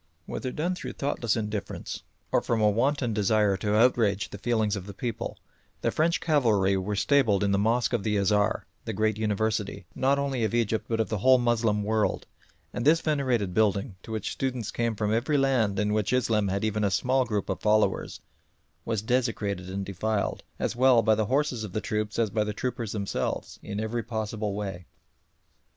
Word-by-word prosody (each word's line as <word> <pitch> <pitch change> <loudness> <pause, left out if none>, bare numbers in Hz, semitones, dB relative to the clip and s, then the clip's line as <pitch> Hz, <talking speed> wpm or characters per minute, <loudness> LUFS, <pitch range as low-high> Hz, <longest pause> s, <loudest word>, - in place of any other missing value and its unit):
Whether 130 - -4
done 170 +7 -1
through 180 - -6
thoughtless 120 -5 -1
indifference 105 -2 -4 0.3
or - - +3
from 115 - 0
a 105 -1 +4
wanton 125 +2 +1
desire 105 -1 +2
to 105 +2 0
outrage 110 -4 +3
the 100 - -8
feelings 110 -2 +1
of 100 -1 -6
the 100 - -8
people, 120 -1 -4 0.4
the - - +1
French 165 +2 +1
cavalry 110 - +2
were 95 +2 -2
stabled 110 -3 +3
in 100 - +2
the 100 - +2
mosque 115 +3 +1
of 120 - +1
the 105 +1 0
Azhar, 105 +1 +1 0.2
the - - -3
great 110 0 0
university, 105 -2 -1
not 135 +2 +2
only 135 -4 -1
of 110 +2 0
Egypt 115 -2 0
but 115 -1 0
of 110 - 0
the 110 -3 -1
whole 130 +5 +6
Moslem 115 -3 +1
world, 110 0 0 0.5
and 120 - -3
this 155 +4 +5
venerated 130 - 0
building, 100 -2 +1
to - - -10
which 110 -3 -3
students 125 -5 -3
came 115 -1 -1
from 105 0 0
every 130 +6 +1
land 125 -7 +2
in 105 +1 +1
which 110 +2 0
Islam 110 -5 +2
had 100 +2 -1
even 110 -1 0
a 100 - +3
small 130 +7 +2
group 105 -5 -2
of - - -3
followers, 105 0 +1 0.6
was 110 -3 -1
desecrated 110 -6 -1
and 95 +1 -3
defiled, 100 +2 -2 0.2
as - - -2
well 125 -2 +5
by 110 - +4
the 110 -1 0
horses 130 -3 0
of 100 -4 -7
the - - 0
troops 105 -1 -2
as 115 -3 +1
by 105 +1 +1
the 105 0 -3
troopers 120 -1 -3
themselves, 100 -2 -3
in 100 0 -5
every 110 +2 -2
possible 110 -3 -3
way. 95 -5 -5
110 Hz, 195 wpm, -27 LUFS, 105-120 Hz, 0.6 s, whole